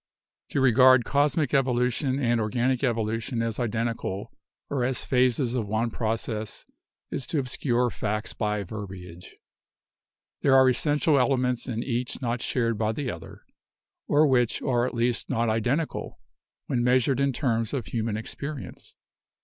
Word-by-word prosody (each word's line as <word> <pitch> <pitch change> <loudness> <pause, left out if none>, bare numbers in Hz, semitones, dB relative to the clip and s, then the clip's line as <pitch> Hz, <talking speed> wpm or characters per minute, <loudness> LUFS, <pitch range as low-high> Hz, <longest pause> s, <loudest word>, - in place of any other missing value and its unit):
"To 140 - 0
regard 130 -1 +6
cosmic 145 0 +1
evolution 130 0 +1
and 120 -4 +1
organic 120 +4 0
evolution 115 0 -1
as 115 0 -3
identical 115 -4 -2 0.4
or 135 -3 -1
as 125 0 0
phases 125 -1 +2
of 115 -5 -1
one 110 +3 0
process 110 -1 -3 0.5
is 135 - -3
to 160 - -1
obscure 125 -2 0
facts 105 0 -3
by 105 -2 -1
verbiage. 90 -3 -9 1.1
There 135 - +4
are 130 0 +7
essential 145 +3 +3
elements 125 -2 +1
in 115 -2 -2
each 125 -1 -2
not 120 -2 -2
shared 115 -4 0
by 110 0 +1
the 130 +1 -3
other - - -11 0.3
— - - -66
or 150 +2 +4
which 125 -5 +2
are 120 -1 +1
at - - -6
least 120 0 0
not 115 0 +1
identical 125 +9 -1 0.5
when 120 -2 0
measured 130 +1 +3
in 140 0 +2
terms 115 -4 -1
of 130 -6 -3
human 110 -2 -2
experience. 140 +5 -7
120 Hz, 145 wpm, -26 LUFS, 115-130 Hz, 1.1 s, are